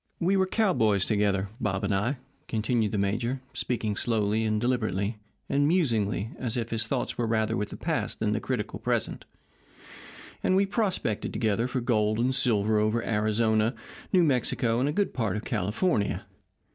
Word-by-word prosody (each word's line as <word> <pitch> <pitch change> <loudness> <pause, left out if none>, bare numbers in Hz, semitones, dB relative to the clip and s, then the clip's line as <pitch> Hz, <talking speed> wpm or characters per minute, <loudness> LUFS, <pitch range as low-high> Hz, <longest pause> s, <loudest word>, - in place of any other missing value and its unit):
"We 185 +3 +2
were 190 -1 +3
cowboys 115 - +2
together, 100 -2 +1
Bob 95 -1 -1
and 100 - +1
I," 115 +8 0 0.3
continued 110 -1 0
the 105 - -1
major, 115 +6 0
speaking 115 -4 -2
slowly, 110 -1 +1
and 110 -1 +1
deliberately, 110 -3 -1 0.3
and 145 +1 +2
musingly, 115 - +1
as 120 -2 -2
if 115 -1 -3
his 115 -1 0
thoughts - - -2
were 120 - +1
rather 110 0 +1
with 105 -2 -2
the - - -8
past - - -2
than 105 -1 +1
the 110 - 0
critical 115 -3 -3
present, - - -1 1.2
"and 185 - +2
we 195 +1 +4
prospected 195 - -1
together 110 +1 +1
for 130 0 -2
gold 110 -3 +1
and 125 +3 +1
silver 110 -5 +2
over 110 +2 +1
Arizona, 110 +1 +1 0.4
New 185 -3 +5
Mexico, 125 -4 +1
and 135 +3 +1
a - - +1
good 200 +5 0
part 110 -6 -1
of 105 - -6
California. 105 - 0
110 Hz, 170 wpm, -27 LUFS, 105-125 Hz, 1.2 s, New